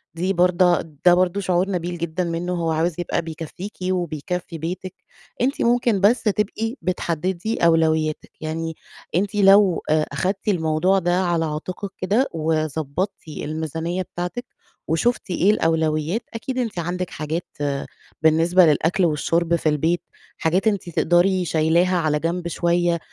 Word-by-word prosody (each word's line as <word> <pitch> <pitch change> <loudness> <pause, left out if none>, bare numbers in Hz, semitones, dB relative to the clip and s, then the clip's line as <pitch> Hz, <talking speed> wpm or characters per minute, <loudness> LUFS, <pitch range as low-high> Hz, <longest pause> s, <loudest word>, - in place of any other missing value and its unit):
دي 185 +3 0
برضا 180 0 +3 0.2
ده 175 - +8
برضه 185 +2 +2
شعور 185 0 +1
نبيل 175 -1 -3
جدًا 170 +2 -2
منّه، 170 +1 -2
هو 165 -2 -1
عاوز 160 +1 0
يبقى 175 - -1
بيكفّيكِ 165 +5 -8
وبيكفّي 175 0 -3
بيتِك. 180 +3 -5 0.5
أنتِ 265 +4 0
ممكن 235 -4 +2
بس 220 +6 +4
تبقي 215 +2 -1
بتحدّدي 180 +3 -2
أولوياتِك. 160 -2 +2
يعني 160 +1 -3 0.4
أنتِ 200 +3 0
لو 195 -2 +5
آآ 155 0 +3
أخدتِ 195 +2 -2
الموضوع 175 +1 +2
ده 175 +1 +1
على 170 -2 +1
عاتِقِك 180 +6 -5
كده 215 +9 +1
وضبّطتِ 160 +3 -2
الميزانيّة 160 +3 -3
بتاعتِك 180 +8 -5 0.4
وشُفتِ 190 +6 0
إيه 185 +3 +3
الأولويات، 160 +2 0
أكيد 255 +3 -4
أنتِ 225 -7 -2
عندِك 180 +1 -3
حاجات 155 +3 -4 0.8
بالنسبة 165 +3 +5
للأكل 165 +4 +2
والشُرب 170 +2 +1
في 160 -2 +1
البيت، 160 +3 +1 0.4
حاجات 180 +6 +1
أنتِ 200 -4 0
تقدري 175 +3 +2
شايلاها 170 +3 +2
على 155 -3 +1
جنب 170 +2 -2
شوية، 170 0 +1
175 Hz, 135 wpm, -22 LUFS, 160-185 Hz, 0.8 s, ده